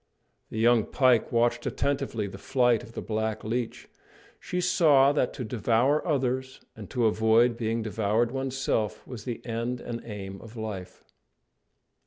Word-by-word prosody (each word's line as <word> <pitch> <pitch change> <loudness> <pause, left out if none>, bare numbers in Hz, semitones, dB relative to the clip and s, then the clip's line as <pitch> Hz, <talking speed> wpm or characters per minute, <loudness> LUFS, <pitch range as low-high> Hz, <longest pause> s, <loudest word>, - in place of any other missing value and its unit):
The - - -6
young 115 0 +4
pike 130 -4 +3
watched 120 0 +1
attentively 135 -6 -1
the 95 0 -8
flight 125 -2 +2
of 115 -1 -13
the - - -5
black 110 0 -2
leech. 115 +2 -3 0.5
She 180 - -3
saw 150 -6 +5
that 145 -3 +1
to 125 - -4
devour 120 +5 +1
others 130 -3 -1 0.2
and 105 -4 -10
to 120 -2 0
avoid 110 +2 +4
being 115 0 -1
devoured 110 +2 0
oneself 135 -5 -2
was 120 -4 -9
the 120 -2 -5
end 120 +1 -2
and 120 -1 -6
aim 95 -3 -7
of 115 +1 -12
life. 105 -5 -6
115 Hz, 150 wpm, -27 LUFS, 110-130 Hz, 0.5 s, saw